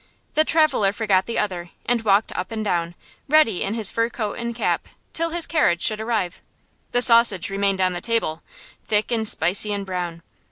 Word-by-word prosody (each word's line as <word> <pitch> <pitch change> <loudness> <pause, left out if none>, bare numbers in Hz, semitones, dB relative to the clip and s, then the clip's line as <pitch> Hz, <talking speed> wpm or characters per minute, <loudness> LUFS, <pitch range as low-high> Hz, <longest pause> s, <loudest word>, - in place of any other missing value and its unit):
The 310 - +3
traveller 310 -12 +3
forgot 205 -4 +1
the 235 - -3
other, 180 -4 -3 0.2
and 240 -1 +1
walked 205 0 +2
up 180 +3 -5
and 220 -1 -4
down, 170 -3 -1 0.3
ready 290 -11 +3
in 200 +3 -1
his 220 -4 +2
fur 230 0 0
coat 215 -3 -4
and 235 0 -4
cap, 235 - -1 0.3
till 330 0 0
his 335 0 +1
carriage 180 - +1
should 215 0 +2
arrive. 215 -6 -2 0.5
The 245 - +3
sausage 230 -7 +4
remained 195 -1 0
on 185 -1 +2
the 175 - -5
table, 225 -9 -1 0.5
thick 210 +1 +1
and 225 -2 0
spicy 205 +2 +1
and 200 -1 -3
brown. 175 -3 -5
210 Hz, 190 wpm, -22 LUFS, 185-235 Hz, 0.5 s, sausage